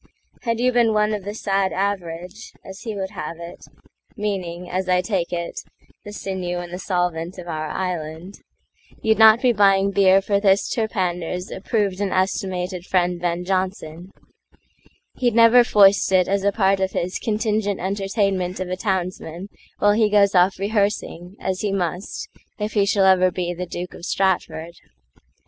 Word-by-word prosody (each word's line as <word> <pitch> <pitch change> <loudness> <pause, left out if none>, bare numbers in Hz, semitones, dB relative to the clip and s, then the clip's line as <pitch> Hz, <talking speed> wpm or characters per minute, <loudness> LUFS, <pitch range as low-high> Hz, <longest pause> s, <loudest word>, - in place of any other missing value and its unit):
Had 230 -2 -1
you 250 +1 +3
been 235 -2 +3
one 210 0 +2
of 205 -2 -4
the 205 +1 -5
sad 195 -3 0
average, 185 0 -4
As 190 +1 -9
he 220 -3 -6
would 190 -1 -4
have 155 +2 -6
it,—meaning, 180 +1 -7
as 185 +1 -3
I 180 0 +4
take 180 -2 -2
it, 170 -1 -4 0.4
The 205 - -9
sinew 185 -3 -4
and 175 0 -7
the 180 - -5
solvent 175 -2 -2
of 175 -1 -9
our 155 -2 -3
Island, 175 +1 -5 0.6
You'd 220 -1 +2
not 220 +2 +7
be 250 -1 +4
buying 195 -1 +3
beer 195 -1 +5
for 200 +1 0
this 200 -1 +2
Terpander'sApproved 190 0 -2
and 200 -2 -1
estimated 185 -1 -1
friend 180 -1 0
Ben 175 0 -2
Jonson; 185 -2 -3 1.1
He'd 240 -3 +1
never 230 +1 +7
foist 200 -4 +4
it 185 -1 +4
as 195 0 0
a 200 - +3
part 195 -2 +2
of 190 0 -1
hisContingent 210 +2 -1
entertainment 195 -1 -1
of 185 -1 -4
a 185 - -3
townsmanWhile 190 +1 -2
he 220 -2 +3
goes 200 -1 +4
off 185 +1 +4
rehearsing, 200 -3 -2
as 190 -1 -3
he 205 - -1
must, 185 - -3 0.3
If 210 0 -3
he 200 -2 +2
shall 200 -1 +3
ever 185 -1 +5
be 175 -1 -3
the 180 +1 -5
Duke 175 +1 -6
of - - -12
Stratford. 175 -3 -1
190 Hz, 160 wpm, -22 LUFS, 180-205 Hz, 1.1 s, not